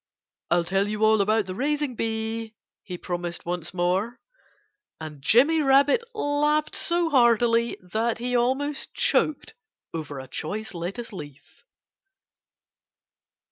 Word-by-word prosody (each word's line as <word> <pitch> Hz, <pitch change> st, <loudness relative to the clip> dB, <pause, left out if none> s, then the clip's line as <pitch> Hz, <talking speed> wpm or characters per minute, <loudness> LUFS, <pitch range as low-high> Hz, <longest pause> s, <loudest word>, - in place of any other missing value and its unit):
"I'll 175 Hz, 0 st, +3 dB
tell 195 Hz, +3 st, 0 dB
you 215 Hz, +1 st, 0 dB
all 215 Hz, -1 st, +4 dB
about 215 Hz, +1 st, +2 dB
the 185 Hz, -, -5 dB
raising 290 Hz, +4 st, -1 dB
bee," 225 Hz, 0 st, -3 dB, 0.3 s
he 180 Hz, -2 st, -7 dB
promised 175 Hz, -1 st, -4 dB
once 175 Hz, -1 st, -3 dB
more. 190 Hz, +6 st, -1 dB, 0.8 s
And 155 Hz, -3 st, -8 dB
Jimmy 275 Hz, -, +4 dB
Rabbit 280 Hz, -, +4 dB
laughed 295 Hz, -3 st, +1 dB
so 340 Hz, -1 st, +1 dB
heartily 235 Hz, -2 st, +3 dB, 0.2 s
that 225 Hz, +1 st, 0 dB
he 245 Hz, +2 st, -2 dB
almost 265 Hz, +4 st, -1 dB
choked 305 Hz, -, +1 dB, 0.4 s
over 150 Hz, -4 st, -5 dB
a 130 Hz, -, -9 dB
choice 210 Hz, -, -5 dB
lettuce 195 Hz, +7 st, -5 dB
leaf. 145 Hz, -5 st, -11 dB
220 Hz, 120 wpm, -25 LUFS, 180-265 Hz, 0.8 s, all